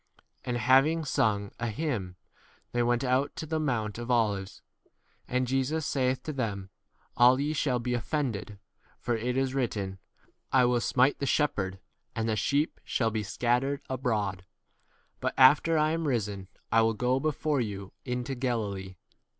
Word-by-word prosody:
And 125 Hz, -1 st, -2 dB
having 135 Hz, +7 st, +4 dB
sung 110 Hz, -8 st, +1 dB
a 115 Hz, -, -1 dB
hymn, 110 Hz, -, -3 dB, 0.6 s
they 120 Hz, -, 0 dB
went 120 Hz, +1 st, +1 dB
out 130 Hz, +2 st, +1 dB
to -, -, -5 dB
the 160 Hz, 0 st, -1 dB
mount 120 Hz, -8 st, -1 dB
27 -, -, -5 dB
of 120 Hz, -, -8 dB
Olives. 105 Hz, -5 st, 0 dB, 0.7 s
And 125 Hz, 0 st, 0 dB
Jesus 135 Hz, +5 st, 0 dB
saith 130 Hz, -3 st, 0 dB
to 155 Hz, -, -4 dB
them, 100 Hz, -7 st, -3 dB, 0.4 s
All 125 Hz, +2 st, +6 dB
ye 150 Hz, +2 st, 0 dB
shall 140 Hz, -4 st, +1 dB
be 125 Hz, +1 st, -2 dB
offended, 120 Hz, -3 st, -2 dB
w 105 Hz, -, -12 dB, 0.4 s
for 120 Hz, -, -1 dB
it 125 Hz, +3 st, -2 dB
is 135 Hz, -1 st, 0 dB
written, 100 Hz, -7 st, -2 dB, 0.5 s
I 130 Hz, -2 st, +5 dB
will 120 Hz, -1 st, +2 dB
smite 130 Hz, +4 st, +2 dB
the 140 Hz, -, -1 dB
shepherd, 100 Hz, -10 st, 0 dB, 0.4 s
and 110 Hz, 0 st, -1 dB
the 110 Hz, -, +1 dB
sheep 140 Hz, +9 st, 0 dB
shall 115 Hz, -2 st, 0 dB
be 110 Hz, -, -1 dB
28 -, -, -5 dB
scattered 125 Hz, +6 st, 0 dB
abroad. 105 Hz, -8 st, -1 dB, 0.8 s
But -, -, -2 dB
after 145 Hz, +5 st, +6 dB
I 155 Hz, 0 st, +3 dB
am 165 Hz, -1 st, -1 dB
risen, 105 Hz, -7 st, -2 dB, 0.2 s
I 115 Hz, -, +5 dB
will 115 Hz, 0 st, +2 dB
go 125 Hz, +4 st, +1 dB
before 150 Hz, -1 st, 0 dB
you 100 Hz, -4 st, -5 dB
into 125 Hz, +1 st, -3 dB
29 125 Hz, -, -8 dB
Galilee. 100 Hz, -7 st, -2 dB
125 Hz, 170 wpm, -29 LUFS, 110-135 Hz, 0.8 s, All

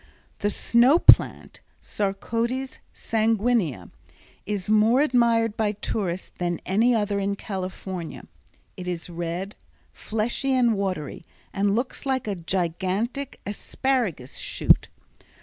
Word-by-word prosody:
The 205 Hz, -, +1 dB
snow 240 Hz, +8 st, +4 dB
plant -, -, +4 dB, 0.2 s
(Sarcodes 230 Hz, +6 st, -2 dB
sanguinea) 220 Hz, -, 0 dB, 0.6 s
is 205 Hz, -2 st, -2 dB
more 215 Hz, +5 st, +4 dB
admired 235 Hz, -5 st, +3 dB
by 215 Hz, -2 st, 0 dB
tourists 190 Hz, -3 st, -3 dB
than 175 Hz, -1 st, -1 dB
any 225 Hz, +6 st, +3 dB
other 205 Hz, -2 st, 0 dB
in 200 Hz, 0 st, -1 dB
California. 185 Hz, -3 st, -6 dB, 0.5 s
It 180 Hz, -2 st, -8 dB
is 175 Hz, 0 st, -4 dB
red, 175 Hz, +4 st, -4 dB, 0.4 s
fleshy 235 Hz, +5 st, -1 dB
and 240 Hz, -3 st, +3 dB
watery 185 Hz, -7 st, -3 dB, 0.3 s
and 200 Hz, 0 st, +1 dB
looks 250 Hz, +3 st, -3 dB
like 260 Hz, -2 st, 0 dB
a 205 Hz, -, 0 dB
gigantic 190 Hz, +9 st, -2 dB
asparagus 210 Hz, -, -2 dB
shoot. -, -, +2 dB
205 Hz, 110 wpm, -25 LUFS, 185-235 Hz, 0.6 s, snow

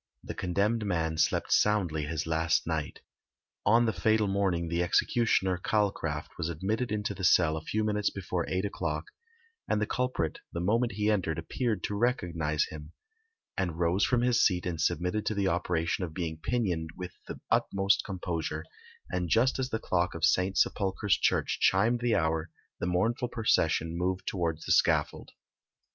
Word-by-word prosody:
The -, -, -6 dB
condemned 100 Hz, +5 st, 0 dB
man 80 Hz, -5 st, -1 dB
slept -, -, +1 dB
soundly 90 Hz, -8 st, +2 dB
his 75 Hz, 0 st, -3 dB
last 80 Hz, 0 st, +1 dB
night. 80 Hz, -3 st, -3 dB, 0.7 s
On 115 Hz, +3 st, +5 dB
the 110 Hz, -, +1 dB
fatal 110 Hz, +4 st, +2 dB
morning 95 Hz, -4 st, 0 dB
the 85 Hz, +1 st, 0 dB
executioner, 95 Hz, +1 st, +2 dB
Calcraft, 95 Hz, -7 st, -1 dB
was 85 Hz, -, -1 dB
admitted 100 Hz, +8 st, -2 dB
into 105 Hz, -1 st, -1 dB
the 95 Hz, -, -8 dB
cell 85 Hz, -3 st, +4 dB
a 80 Hz, -, -4 dB
few 110 Hz, +7 st, -1 dB
minutes 105 Hz, -1 st, +1 dB
before 90 Hz, -3 st, -3 dB
eight 95 Hz, +2 st, -1 dB
o'clock, 85 Hz, -6 st, -3 dB, 0.6 s
and 105 Hz, -, +1 dB
the 105 Hz, -, +1 dB
culprit 125 Hz, -, -2 dB
the 85 Hz, -, -4 dB
moment 115 Hz, +6 st, +1 dB
he 105 Hz, +1 st, +1 dB
entered 85 Hz, -6 st, 0 dB
appeared 105 Hz, +4 st, -2 dB
to -, -, -2 dB
recognise 85 Hz, -, 0 dB
him, 75 Hz, 0 st, -9 dB, 0.6 s
and 90 Hz, -4 st, -2 dB
rose 85 Hz, +3 st, +1 dB
from 125 Hz, -1 st, +2 dB
his 120 Hz, -1 st, +3 dB
seat 90 Hz, -3 st, +2 dB
and 85 Hz, -3 st, -2 dB
submitted 90 Hz, +5 st, 0 dB
to 110 Hz, -, 0 dB
the 100 Hz, -1 st, +1 dB
operation 85 Hz, 0 st, 0 dB
of 80 Hz, -3 st, -5 dB
being 80 Hz, -3 st, -3 dB
pinioned 90 Hz, -10 st, -1 dB
with 90 Hz, -1 st, -6 dB, 0.2 s
the -, -, -7 dB
utmost 100 Hz, 0 st, +2 dB
composure; 85 Hz, -5 st, -4 dB, 0.5 s
and 90 Hz, -2 st, -2 dB
just 125 Hz, +7 st, +3 dB
as 130 Hz, -1 st, -1 dB
the 110 Hz, -, -1 dB
clock 90 Hz, -5 st, -1 dB
of 85 Hz, -, +2 dB
St. 95 Hz, +1 st, +2 dB
Sepulchre's 100 Hz, 0 st, +2 dB
church -, -, 0 dB
chimed 110 Hz, +6 st, +3 dB
the 120 Hz, -1 st, +1 dB
hour 80 Hz, 0 st, 0 dB, 0.3 s
the -, -, -2 dB
mournful 115 Hz, +8 st, 0 dB
procession 85 Hz, -8 st, +1 dB
moved 90 Hz, +1 st, -1 dB
towards 85 Hz, -4 st, -2 dB
the -, -, -2 dB
scaffold. -, -, +2 dB
90 Hz, 170 wpm, -29 LUFS, 85-105 Hz, 0.7 s, On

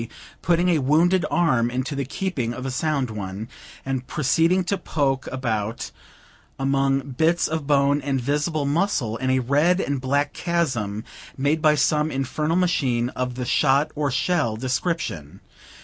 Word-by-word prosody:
putting 175 Hz, +1 st, +2 dB
a 165 Hz, -3 st, +3 dB
wounded 165 Hz, +7 st, +3 dB
arm 125 Hz, -9 st, +2 dB
into 130 Hz, +4 st, -3 dB
the 140 Hz, -, -1 dB
keeping 130 Hz, -7 st, -3 dB
of 130 Hz, -, -6 dB
a 135 Hz, -, -2 dB
sound 135 Hz, -2 st, -1 dB
one, 100 Hz, +1 st, -5 dB, 0.4 s
and 130 Hz, -2 st, -3 dB
proceeding 165 Hz, +6 st, +2 dB
to 190 Hz, +3 st, 0 dB
poke 140 Hz, -7 st, -1 dB
about 115 Hz, -4 st, -3 dB, 0.7 s
among 135 Hz, 0 st, +1 dB
bits 160 Hz, +6 st, +2 dB
of 155 Hz, -3 st, -3 dB
bone 145 Hz, 0 st, +3 dB
and 135 Hz, -1 st, -1 dB
visible 145 Hz, +3 st, -1 dB
muscles, 140 Hz, -, 0 dB
in 130 Hz, -, 0 dB
a 130 Hz, -, +3 dB
red 145 Hz, +8 st, +2 dB
and 140 Hz, -7 st, -1 dB
black 140 Hz, +2 st, 0 dB
chasm 120 Hz, -, -1 dB, 0.3 s
made 145 Hz, +4 st, +1 dB
by 155 Hz, -1 st, +5 dB
some 150 Hz, +1 st, +2 dB
infernal 150 Hz, +4 st, -1 dB
machine 135 Hz, -10 st, +1 dB
of 125 Hz, -1 st, -3 dB
the 125 Hz, 0 st, -3 dB
shot 140 Hz, +4 st, +2 dB
or 145 Hz, -1 st, -1 dB
shell 135 Hz, -2 st, 0 dB
description. 125 Hz, -, -3 dB
140 Hz, 150 wpm, -23 LUFS, 125-160 Hz, 0.7 s, by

